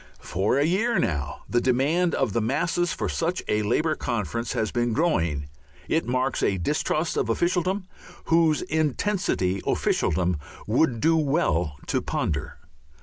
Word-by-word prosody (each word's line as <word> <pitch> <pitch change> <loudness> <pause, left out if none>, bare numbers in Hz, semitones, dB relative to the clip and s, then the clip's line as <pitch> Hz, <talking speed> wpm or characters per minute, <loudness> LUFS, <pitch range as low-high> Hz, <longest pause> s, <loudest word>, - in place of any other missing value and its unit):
For 95 +8 0
a 140 - +3
year 195 +9 +1
now 70 -5 -2
the 120 - +1
demand 145 +8 +2
of 130 -7 0
the 115 - +1
masses 165 +9 0
for - - -2
such 170 +2 -1
a 105 - +1
Labour 135 +10 +1
conference 115 +1 -2
has 110 - -1
been 120 -1 0
growing. 85 - 0 0.4
It 160 -4 0
marks 130 +2 0
a 95 - +1
distrust 150 - -1
of - - 0
officialdom 185 +2 0 0.4
whose 165 -2 +3
intensity 155 - 0
officialdom 90 -1 +1 0.3
would 120 +1 +1
do 165 0 +4
well 135 - +1
to - - 0
ponder. 75 +1 -2
130 Hz, 145 wpm, -25 LUFS, 100-165 Hz, 0.4 s, do